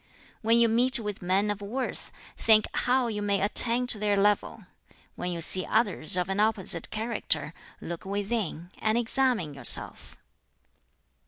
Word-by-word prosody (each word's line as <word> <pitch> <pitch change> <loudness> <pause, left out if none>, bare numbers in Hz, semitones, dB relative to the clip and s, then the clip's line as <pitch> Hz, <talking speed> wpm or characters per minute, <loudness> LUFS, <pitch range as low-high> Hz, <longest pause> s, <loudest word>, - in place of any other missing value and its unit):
"When 230 0 +2
you 235 - +4
meet 245 +4 +2
with 210 -3 -6
men 190 +3 0
of 205 0 -7
worth, 245 +6 -5 0.2
think 215 -1 +3
how 250 +1 0
you 215 -3 -4
may 200 -1 -1
attain 230 +5 +1
to 240 -4 -1
their 205 -1 0
level; 205 +1 -1 0.5
when 180 - -5
you 170 -1 -6
see 185 +3 +4
others 200 -7 +2
of 180 - -1
an 195 +1 -3
opposite 200 -5 +2
character, 210 -9 -2 0.3
look 170 0 -8
within, 200 -3 -5
and 220 +1 0
examine 240 - +1
yourself. 135 -3 +2
210 Hz, 150 wpm, -26 LUFS, 185-230 Hz, 0.5 s, you